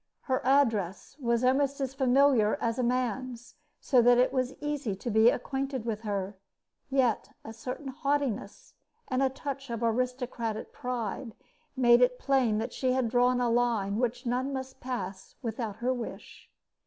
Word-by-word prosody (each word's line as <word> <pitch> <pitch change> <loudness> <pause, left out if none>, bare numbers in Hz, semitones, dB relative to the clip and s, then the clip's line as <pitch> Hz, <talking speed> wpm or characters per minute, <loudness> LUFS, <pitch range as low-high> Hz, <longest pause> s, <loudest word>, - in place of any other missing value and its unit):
Her 260 -1 -1
address 230 -7 +1
was 235 -2 +1
almost 275 +2 +2
as 265 -1 -2
familiar 265 -4 +4
as 230 +2 -1
a - - +1
man's, 250 0 -2 0.3
so 255 -4 +4
that 245 +1 +6
it 255 +1 +3
was 255 -1 -1
easy 295 -8 -2
to 235 +5 -4
be 220 +2 +6
acquainted 265 -1 -2
with 220 -2 -2
her; 200 -2 -3 0.5
yet 260 -5 +1 0.2
a 225 - -7
certain 255 +4 -6
haughtiness 275 -6 -2 0.4
and 255 0 0
a 270 - +3
touch 275 0 -6
of 235 0 -3
aristocratic 240 -1 -2
pride 240 -1 -4 0.4
made 240 -1 +6
it 250 0 +4
plain 255 -6 +2
that 230 +3 -3
she 255 -1 0
had 255 -3 +1
drawn 245 0 +3
a 240 -1 +1
line 230 -4 +1
which 245 +1 -1
none 250 +3 -1
must 265 -1 -6
pass 195 -7 -5
without 225 -2 -3
her 245 +4 0
wish. 245 -2 -8
250 Hz, 160 wpm, -29 LUFS, 230-265 Hz, 0.5 s, that